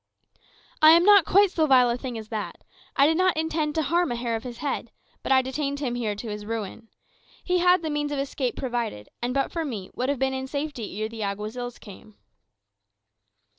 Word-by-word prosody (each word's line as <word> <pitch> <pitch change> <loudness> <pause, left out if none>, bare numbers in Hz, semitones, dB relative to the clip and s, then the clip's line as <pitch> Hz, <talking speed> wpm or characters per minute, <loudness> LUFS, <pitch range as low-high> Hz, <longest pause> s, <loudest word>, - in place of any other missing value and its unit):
"I 310 +1 +9
am 340 +1 +6
not 405 -4 +7
quite 400 0 +5
so 315 -4 +1
vile 250 -3 +5
a - - 0
thing 245 -1 -5
as 215 -1 -8
that. 215 -2 -5 0.3
I 275 - +5
did 320 +2 +3
not 370 -2 +2
intend 315 -1 -1
to 320 - +1
harm 340 +1 +1
a - - -1
hair 235 -1 -2
of 225 - -3
his 245 -1 -8
head; 290 +3 -3 0.3
but - - -3
I 260 -1 +5
detained 280 +2 -3
him 260 -5 -2
here 225 -4 -2
to 215 +3 -7
his 210 0 -6
ruin. 225 0 -5 0.6
He 360 0 +1
had 360 0 +4
the 315 - -2
means 295 0 -1
of 290 - -2
escape 275 -2 -2
provided, 235 - -3
and 240 +1 -1
but 275 +1 0
for 330 - -2
me 220 -11 -6
would 255 +2 -2
have 285 - 0
been 265 +1 0
in 265 0 -4
safety 280 -8 -4
ere 215 - -1
the 225 0 -8
Alguazils 215 +5 -4
came." 210 +1 -13
260 Hz, 215 wpm, -25 LUFS, 230-305 Hz, 0.6 s, I